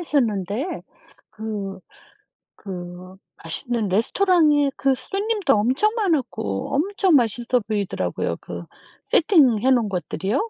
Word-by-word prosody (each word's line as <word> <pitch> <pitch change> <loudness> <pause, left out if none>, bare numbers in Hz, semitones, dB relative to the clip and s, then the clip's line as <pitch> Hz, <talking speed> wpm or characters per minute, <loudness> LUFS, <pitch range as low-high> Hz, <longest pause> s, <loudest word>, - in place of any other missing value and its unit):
있었는데 240 - -1 0.5
그 210 -3 -5 0.8
그 180 -1 -9 0.3
맛있는 220 +5 -2
레스토랑에 295 - +3
그 270 -1 +2
손님도 405 - 0
엄청 260 - +2
많았고 270 - -1
엄청 375 +3 +2
맛있어 240 0 +2
보이더라고요. 205 -3 -2
그 - - -8 0.4
세팅해 265 - +4
놓은 235 -5 +2
것들이요 195 - -2
245 Hz, 250 characters per minute, -22 LUFS, 200-320 Hz, 0.8 s, 세팅해